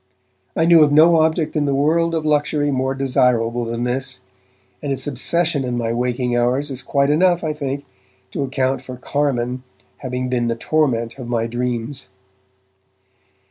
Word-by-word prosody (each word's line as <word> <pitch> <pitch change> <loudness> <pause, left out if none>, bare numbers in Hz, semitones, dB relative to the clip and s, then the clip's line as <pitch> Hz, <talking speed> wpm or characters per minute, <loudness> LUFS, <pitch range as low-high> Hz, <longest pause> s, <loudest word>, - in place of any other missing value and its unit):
I 160 - +2
knew 170 -1 +7
of 150 -1 +5
no 160 +3 +6
object 160 0 +1
in 150 -1 +1
the 140 -1 +1
world 165 +4 +2
of 160 -1 -2
luxury 145 -1 +1
more 130 0 -1
desirable 120 -3 +1
than 115 +1 -3
this, 130 +1 -2 0.6
and 145 - -3
its 135 - -2
obsession 150 +2 0
in 125 -1 -2
my 115 -1 -1
waking 125 0 -1
hours 125 +4 +1
is 130 -1 -4
quite 140 0 +1
enough, 175 +2 +3
I 155 -1 -1
think, 140 -1 -4 0.5
to - - -3
account 130 -1 -1
for 130 -1 -8
'carmine' 125 -2 -1 0.4
having 125 -1 -3
been 125 -2 0
the 115 - 0
torment 120 -3 0
of 125 - -6
my 115 -2 0
dreams. 120 +2 -3
135 Hz, 165 wpm, -20 LUFS, 125-150 Hz, 0.6 s, knew